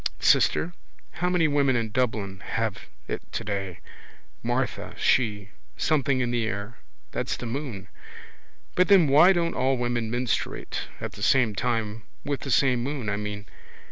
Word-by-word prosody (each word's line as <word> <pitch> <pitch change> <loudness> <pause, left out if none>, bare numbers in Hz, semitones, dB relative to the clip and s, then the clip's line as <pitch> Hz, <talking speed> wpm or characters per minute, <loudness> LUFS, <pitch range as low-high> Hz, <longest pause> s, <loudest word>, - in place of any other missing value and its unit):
Sister? 175 - +3 0.4
How 180 +1 -1
many 175 -3 +3
women 140 -3 +2
in 115 -2 -1
Dublin 105 -6 -1
have 110 -1 -3 0.2
it - - -3
today? 100 -5 -4 0.6
Martha, - - -2
she. 105 -5 +1 0.3
Something 140 -4 +2
in 120 -1 0
the 120 -1 +1
air. 105 +3 -5 0.3
That's - - -2
the - - -6
moon. 115 -5 -5 0.9
But 180 - +3
then 190 -6 +6
why 155 +7 +7
don't 170 -2 +1
all 130 +1 +1
women 120 -2 -1
menstruate 120 +1 -2
at - - -4
the - - -11
same 120 0 +3
time 115 0 -1 0.2
with 140 -1 -1
the 140 - -6
same 125 -1 +3
moon, 130 -4 -3
I 100 - 0
mean? 105 0 -5
120 Hz, 150 wpm, -26 LUFS, 105-140 Hz, 0.9 s, why